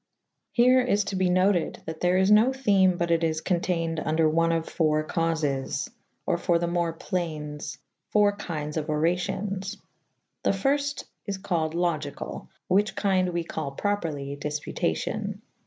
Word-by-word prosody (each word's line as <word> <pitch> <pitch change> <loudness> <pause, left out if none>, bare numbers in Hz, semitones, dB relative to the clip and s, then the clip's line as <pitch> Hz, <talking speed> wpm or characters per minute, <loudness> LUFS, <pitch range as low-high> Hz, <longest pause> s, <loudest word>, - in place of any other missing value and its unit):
Here 255 +1 +5
is 210 -5 +2
to 195 - -4
be 185 -1 +2
noted 185 -1 +2
that 160 0 -6
there 180 +1 +3
is 190 +2 +3
no 220 +5 +6
theme 200 -9 +3
but 170 -1 0
it 165 0 +2
is 160 -1 +1
conteined 165 -2 0
vnder 155 0 +2
one 165 +1 +3
of 165 -1 0
.iiii.^ 155 -2 +1
caufis/or 160 -5 -2
for 170 - +2
the 170 - -1
more 170 -1 0
playnes 155 -3 -4 0.2
= - - -42
.iiii.^ 205 -1 +4
kyndes 150 -4 -4
of 155 - -2
oracions. 190 +5 -1 0.6
The - - +1
fyrfte 280 +8 0 0.2
is 200 -1 -2
callyd 170 -5 -1
Logycall, 160 -5 -2 0.2
whiche 200 +3 +2
kynde 185 -3 +2
we 170 -1 -1
call 155 -4 -4
properly 150 -7 -2
difputacio«. 150 +1 -2
175 Hz, 150 wpm, -26 LUFS, 160-195 Hz, 0.6 s, no